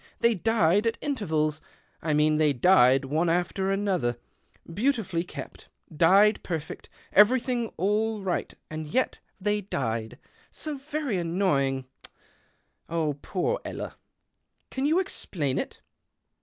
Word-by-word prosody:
They 235 Hz, 0 st, +4 dB
died 205 Hz, 0 st, +2 dB
at 230 Hz, -, -1 dB
ntervals 155 Hz, -, -1 dB, 0.2 s
— -, -, -39 dB
I 155 Hz, -2 st, 0 dB
mean 150 Hz, 0 st, +3 dB
they 150 Hz, -2 st, +3 dB
died 135 Hz, -3 st, +5 dB
one 155 Hz, +5 st, +1 dB
after 180 Hz, +3 st, 0 dB
another, 190 Hz, -, 0 dB, 0.6 s
beautifully 205 Hz, -6 st, 0 dB
kept, 180 Hz, -, -9 dB, 0.3 s
died 195 Hz, +7 st, +5 dB
perfect, 165 Hz, -3 st, -5 dB, 0.2 s
everything 240 Hz, +2 st, +4 dB
all 210 Hz, +2 st, 0 dB
ight 180 Hz, -, -2 dB
— -, -, -51 dB
and 155 Hz, 0 st, -5 dB
yet 255 Hz, +12 st, 0 dB, 0.2 s
they 210 Hz, +1 st, 0 dB
died. 115 Hz, -, -3 dB, 0.3 s
So 305 Hz, -2 st, -5 dB
very 290 Hz, -6 st, -2 dB
annoying 165 Hz, -7 st, 0 dB, 1.0 s
o 160 Hz, -3 st, 0 dB
poor 340 Hz, -, -1 dB
Ella. -, -, -6 dB, 0.8 s
Can 270 Hz, +2 st, 0 dB
you 320 Hz, +3 st, +3 dB
explain 155 Hz, -, -2 dB
it -, -, -6 dB
185 Hz, 125 wpm, -27 LUFS, 155-220 Hz, 1.0 s, died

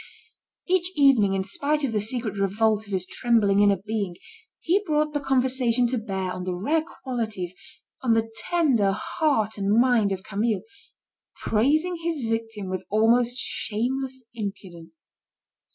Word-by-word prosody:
Each 365 Hz, 0 st, +1 dB
evening 255 Hz, -9 st, +4 dB
in 190 Hz, -, 0 dB
spite 290 Hz, +9 st, -1 dB
of 270 Hz, -, 0 dB
the 210 Hz, -2 st, 0 dB
secret 225 Hz, +1 st, -2 dB
revolt 210 Hz, +2 st, +1 dB
of -, -, -11 dB
his 185 Hz, -2 st, -1 dB
trembling 215 Hz, -5 st, +2 dB
inner 205 Hz, -1 st, +5 dB
being, 210 Hz, -5 st, -2 dB, 0.4 s
he 370 Hz, +4 st, +2 dB
brought 305 Hz, -4 st, 0 dB
the 290 Hz, -, 0 dB
conversation 255 Hz, -3 st, +1 dB
to 250 Hz, -1 st, -1 dB
bear 190 Hz, -4 st, -3 dB
on 180 Hz, -, -5 dB
the 180 Hz, 0 st, -3 dB
rare 300 Hz, -, 0 dB, 0.2 s
qualities, 220 Hz, -9 st, -3 dB, 0.5 s
on 245 Hz, -3 st, +2 dB
the 225 Hz, 0 st, +1 dB, 0.2 s
tender 265 Hz, -, +3 dB
heart 220 Hz, -2 st, -1 dB
and 200 Hz, +3 st, +2 dB
mind 240 Hz, -5 st, +3 dB
of 190 Hz, -1 st, -3 dB
Camille, 215 Hz, +2 st, -1 dB, 0.7 s
praising 310 Hz, +11 st, +1 dB
his 325 Hz, -8 st, -2 dB
victim 225 Hz, -3 st, -3 dB
with 185 Hz, 0 st, -3 dB
most 235 Hz, +3 st, +3 dB
shameless 260 Hz, +4 st, -2 dB
impudence. 175 Hz, -7 st, -8 dB
225 Hz, 145 wpm, -25 LUFS, 200-265 Hz, 0.7 s, inner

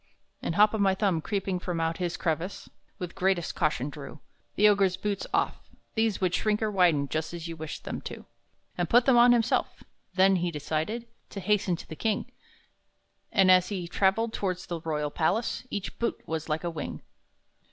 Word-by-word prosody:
And 165 Hz, -, -2 dB
Hop 210 Hz, +2 st, +5 dB
o' 220 Hz, -, -1 dB
my 195 Hz, -1 st, +3 dB
Thumb, 190 Hz, -5 st, +1 dB
creeping 195 Hz, 0 st, -2 dB
from 175 Hz, -2 st, -3 dB
out 165 Hz, 0 st, 0 dB
his 175 Hz, -2 st, -2 dB
crevice, 170 Hz, +3 st, -2 dB, 0.3 s
With 180 Hz, -1 st, -5 dB
greatest 190 Hz, -3 st, 0 dB
caution 145 Hz, -2 st, 0 dB
drew 145 Hz, +1 st, -9 dB, 0.4 s
The 210 Hz, -, +6 dB
Ogre's 200 Hz, -3 st, +3 dB
boots 205 Hz, -2 st, -2 dB
off -, -, -1 dB, 0.2 s
(these 220 Hz, -2 st, +1 dB
would 185 Hz, -2 st, +1 dB
shrink 210 Hz, +3 st, +1 dB
or 215 Hz, -, 0 dB
widen 170 Hz, -7 st, +3 dB
Just 155 Hz, +3 st, -3 dB
as 170 Hz, 0 st, -6 dB
you 165 Hz, -, -5 dB
wished 160 Hz, -1 st, -7 dB
them -, -, -5 dB
to), -, -, -7 dB, 0.5 s
And 175 Hz, -, 0 dB
put 240 Hz, +1 st, +5 dB
them 265 Hz, -, +5 dB
on 240 Hz, +1 st, +7 dB
himself. 240 Hz, 0 st, +1 dB, 0.3 s
Then 190 Hz, 0 st, +5 dB
he 175 Hz, 0 st, 0 dB
decided 160 Hz, +9 st, -3 dB, 0.2 s
To 200 Hz, -, -6 dB
hasten 195 Hz, -2 st, +1 dB
to -, -, -11 dB
the 160 Hz, -, -7 dB
king; 210 Hz, +7 st, -1 dB, 1.0 s
And, 190 Hz, -4 st, +5 dB
as 185 Hz, -1 st, +5 dB
he 185 Hz, -4 st, -3 dB
traveled 205 Hz, +5 st, +1 dB
towards 185 Hz, -1 st, -2 dB
the 170 Hz, -2 st, -5 dB
royal 150 Hz, -2 st, -2 dB
palace, 205 Hz, +11 st, 0 dB
Each 200 Hz, -1 st, -4 dB
boot 235 Hz, -, -1 dB
was 160 Hz, 0 st, -3 dB
like 155 Hz, +2 st, -1 dB
a 170 Hz, -, -2 dB
wing. 160 Hz, -2 st, -6 dB
185 Hz, 190 wpm, -28 LUFS, 165-205 Hz, 1.0 s, on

